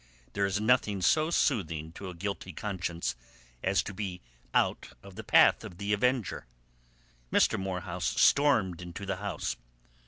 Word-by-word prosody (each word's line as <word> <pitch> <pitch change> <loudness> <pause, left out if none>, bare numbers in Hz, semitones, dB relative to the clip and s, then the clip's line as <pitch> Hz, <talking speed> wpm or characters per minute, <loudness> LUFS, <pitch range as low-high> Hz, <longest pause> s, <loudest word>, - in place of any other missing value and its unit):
There 100 0 +1
is 100 +2 -1
nothing 105 -4 +2
so 155 - +3
soothing 80 - 0
to 95 +2 -8
a 90 - -8
guilty 95 0 -5
conscience 85 -6 -3 0.5
as 95 +1 +2
to 100 - -6
be 95 -2 -4 0.3
out - - 0
of 100 -1 -12
the - - -8
path - - +5
of 85 - -9
the 100 +1 -1
avenger. 125 - 0 0.8
Mr. - - +3
Morehouse 95 -2 -3
stormed 110 - +4
into 90 +3 -7
the 95 -1 -2
house. 100 -5 -3
100 Hz, 150 wpm, -29 LUFS, 90-105 Hz, 0.8 s, path